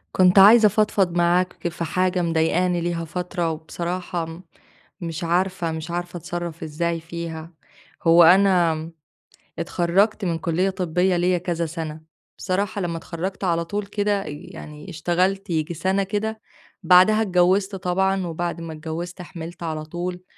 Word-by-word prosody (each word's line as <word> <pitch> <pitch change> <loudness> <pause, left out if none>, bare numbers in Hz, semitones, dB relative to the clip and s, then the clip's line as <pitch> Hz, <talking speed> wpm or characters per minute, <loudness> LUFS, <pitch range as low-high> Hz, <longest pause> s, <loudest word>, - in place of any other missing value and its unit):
كنت 185 +1 +6
عايزة 215 +3 +8
أفضفض 200 -4 +1
معاك 175 +1 +1
في 170 0 -5
حاجة 185 +2 0
مضايقاني 170 +2 +1
ليها 170 -1 -2
فترة 180 0 -3
وبصراحة 170 +2 -4
م 165 +2 -9 0.6
مش 165 0 -4
عارفة 175 0 0
مش 160 +1 -5
عارفة 175 +1 -4
أتصرَّف 170 0 -5
إزاي 165 +2 -2
فيها. 165 0 -7 0.5
هو 170 +1 +7
أنا 170 -3 +4 0.7
اتخرَّجت 195 +5 +1
من 170 -2 0
كُلّية 175 +3 0
طبّية 180 0 0
ليّا 180 +1 +2
كذا 170 -1 -2
سَنة، 160 -1 -6 0.4
بصراحة 200 +2 -2
لّما 170 -2 -2
اتخرَّجت 180 +4 -5
على 170 -2 +1
طول 205 +4 -3
كده 205 0 -1
يعني 150 +2 -9
اشتغلت 185 +4 0
ييجي 165 0 -1
سَنة 190 +4 0
كده، 215 +2 -3 0.4
بعدها 185 +4 +6
اتجوِّزت 190 0 +2
طبعًا 190 0 0
وبعد 170 +1 -3
ما 165 -1 -6
اتجوِّزت 165 +3 -6
حِمِلْت 170 -1 -8
على 155 -2 -4
طول، 180 +3 -5
175 Hz, 140 wpm, -23 LUFS, 165-190 Hz, 0.7 s, عايزة